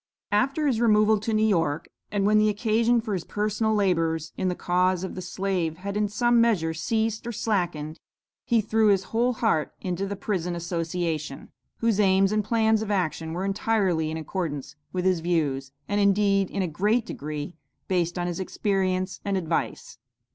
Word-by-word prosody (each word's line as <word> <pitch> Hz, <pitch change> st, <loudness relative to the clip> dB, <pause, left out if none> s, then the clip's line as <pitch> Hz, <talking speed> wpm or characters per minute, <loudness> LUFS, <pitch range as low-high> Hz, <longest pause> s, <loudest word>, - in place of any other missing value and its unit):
After 270 Hz, +9 st, +1 dB
his 245 Hz, -5 st, +1 dB
removal 215 Hz, -2 st, +4 dB
to 220 Hz, +2 st, -3 dB
New 215 Hz, 0 st, +3 dB
York, 165 Hz, -7 st, +1 dB, 0.2 s
and 200 Hz, -1 st, 0 dB
when 215 Hz, +1 st, +5 dB
the 215 Hz, 0 st, +4 dB
occasion 225 Hz, +3 st, +2 dB
for 220 Hz, -2 st, -4 dB
his 180 Hz, -3 st, -2 dB
personal 215 Hz, +3 st, 0 dB
labors 165 Hz, -5 st, 0 dB
in 185 Hz, -, -1 dB
the 180 Hz, -, 0 dB
cause 180 Hz, +1 st, +1 dB
of 190 Hz, -, -4 dB
the 185 Hz, -, -6 dB
slave 180 Hz, -3 st, -2 dB
had 200 Hz, +2 st, -5 dB
in 210 Hz, 0 st, +1 dB
some 235 Hz, +3 st, +3 dB
measure, 185 Hz, -9 st, +2 dB
ceased 220 Hz, +7 st, -1 dB
or -, -, -2 dB
slackened, 175 Hz, -8 st, -2 dB, 0.4 s
he 235 Hz, -2 st, +2 dB
threw 220 Hz, +1 st, +2 dB
his 195 Hz, -2 st, +4 dB
whole 240 Hz, +2 st, 0 dB
heart 220 Hz, -, 0 dB
into 185 Hz, +1 st, -3 dB
the 200 Hz, -, -3 dB
Prison 180 Hz, -3 st, -2 dB
Association, 165 Hz, -3 st, -3 dB, 0.3 s
whose 230 Hz, -3 st, +2 dB
aims 195 Hz, -1 st, +4 dB
and 215 Hz, 0 st, +1 dB
plans 220 Hz, 0 st, +2 dB
of 220 Hz, -, -4 dB
action 165 Hz, -4 st, -1 dB
were 180 Hz, +3 st, -2 dB
entirely 195 Hz, -5 st, +1 dB
in 160 Hz, -, -3 dB
accordance 155 Hz, -4 st, -4 dB, 0.2 s
with 180 Hz, 0 st, -2 dB
his 185 Hz, -2 st, +3 dB
views, 150 Hz, -6 st, -1 dB, 0.2 s
and 205 Hz, 0 st, +1 dB
indeed, 200 Hz, -1 st, +3 dB
in 195 Hz, -, -1 dB
a -, -, -1 dB
great 210 Hz, +9 st, +1 dB
degree, 150 Hz, +3 st, -5 dB, 0.3 s
based 175 Hz, -2 st, 0 dB
on 175 Hz, -, -1 dB
his 175 Hz, 0 st, -3 dB
experience 185 Hz, -1 st, -1 dB
and 200 Hz, -1 st, 0 dB
advice. 170 Hz, -3 st, -3 dB
195 Hz, 180 wpm, -26 LUFS, 170-215 Hz, 0.4 s, when